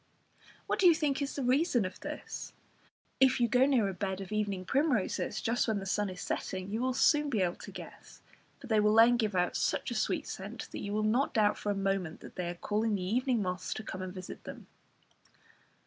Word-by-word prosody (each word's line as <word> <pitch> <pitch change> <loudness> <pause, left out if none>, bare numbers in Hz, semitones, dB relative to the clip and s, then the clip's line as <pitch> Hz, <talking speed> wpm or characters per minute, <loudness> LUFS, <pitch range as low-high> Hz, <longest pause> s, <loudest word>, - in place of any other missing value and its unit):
What - - -1
do 375 - +6
you 340 - +7
think 295 -4 0
is 280 - -3
the 280 - -2
reason 255 - +2
of 185 - -6
this? - - -7 0.7
If 265 -1 +5
you 240 - +3
go 250 +4 +4
near 250 -7 +3
a 195 - -3
bed 190 0 -3
of 195 0 -7
evening 205 -3 -1
primroses 275 - 0
just 235 +2 +1
when 220 -2 +1
the 195 - -5
sun 205 +1 0
is 185 -1 -7
setting, 185 +1 -3
you 220 +3 -1
will 255 0 0
soon 295 +1 +4
be 215 -8 +1
able 175 -1 -1
to - - -10
guess, - - -11 0.4
for - - -11
they 220 -3 +2
will 210 +1 +3
then 230 +2 +7
give 215 -4 0
out 180 -1 +1
such - - 0
a - - -1
sweet - - 0
scent - - -7
that - - -5
you 200 - -4
will 215 +1 0
not 235 +6 +1
doubt 210 -2 +4
for 205 - -2
a - - -1
moment 195 -4 -1
that - - -12
they 180 -1 -3
are 175 - -4
calling 210 +4 0
the 190 - -3
evening 240 +3 +1
moths 185 0 -3
to 220 - -5
come 185 -3 -6
and 185 -1 -4
visit 185 -1 -8
them. - - -9
215 Hz, 230 wpm, -31 LUFS, 190-250 Hz, 0.7 s, you